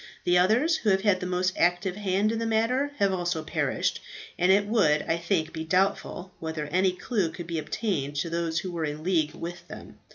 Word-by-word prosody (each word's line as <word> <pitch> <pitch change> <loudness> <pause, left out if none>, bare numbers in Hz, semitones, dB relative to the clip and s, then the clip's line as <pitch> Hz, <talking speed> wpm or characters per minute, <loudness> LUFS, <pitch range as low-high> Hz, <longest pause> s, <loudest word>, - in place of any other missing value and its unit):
The 175 - +2
others, 230 - +3
who 220 - 0
have 190 -1 +3
had 200 -3 +3
the 180 - -4
most 180 +1 0
active 175 +2 +2
hand 205 +1 +1
in 225 - -2
the 230 - -2
matter, 240 +6 +1
have 195 -1 +2
also 175 -3 -1
perished; - - -1 0.3
and 180 +2 +3
it 200 +1 +4
would, 200 -9 +3
I 165 - 0
think, 170 -2 -1
be 160 -1 -4
doubtful 185 +1 0
whether 160 -2 -4
any 185 +5 +2
clue 190 -1 -1
could 170 +2 -8
be 165 -1 -3
obtained 150 -4 -2
to 155 +4 -1
those 165 -1 -1
who 185 - -5
were 170 -2 -3
in 150 0 -4
league 165 -4 +1
with 175 +1 -7
them. - - -11
180 Hz, 215 wpm, -27 LUFS, 165-200 Hz, 0.3 s, it